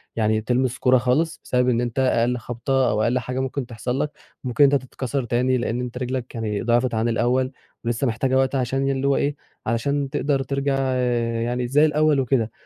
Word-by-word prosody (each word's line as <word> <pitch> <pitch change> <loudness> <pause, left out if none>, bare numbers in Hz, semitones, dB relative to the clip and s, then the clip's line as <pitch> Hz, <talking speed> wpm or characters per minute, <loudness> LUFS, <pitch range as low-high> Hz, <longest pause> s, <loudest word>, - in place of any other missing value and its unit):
يعني 110 -1 +1
تلمس 125 +2 0
كورة 130 0 +4
خالص، 145 +7 0
بسبب 125 0 +1
إن 120 -1 +2
أنت 120 +2 -2
أقل 125 -1 +2
خبطة 125 +2 0
أو 105 +1 +1
أقل 125 +2 +2
حاجة 125 +1 -4
ممكن 130 0 -2
تحصل 125 +2 -4
لك 150 0 -1 0.3
ممكن 125 +3 +2
إن 140 - +6
أنت 140 - +3
تتكسر 130 +1 -3
تاني، 125 +2 +1
لإن 120 0 -2
أنت 125 0 -5
رِجلَك 125 0 -4
يعني 105 -3 -2
ضِعفت 120 +1 +1
عن 110 +1 +1
الأول 125 +3 +1 0.3
ولسه 120 +3 0
محتاجة 130 +3 +1
وقت 135 +1 +1
عشان 135 +1 0
ي - - +2
اللي 135 0 -1
هو 140 - +3
إيه 145 0 0 0.3
علشان 140 +5 0
تقدر 140 -1 0
ترجع 140 +1 -1 0.7
يعني 120 +1 -1
زي 145 +5 +4
الأول 150 -1 +3
وكده، 120 -4 +1
125 Hz, 200 wpm, -23 LUFS, 120-135 Hz, 0.7 s, إن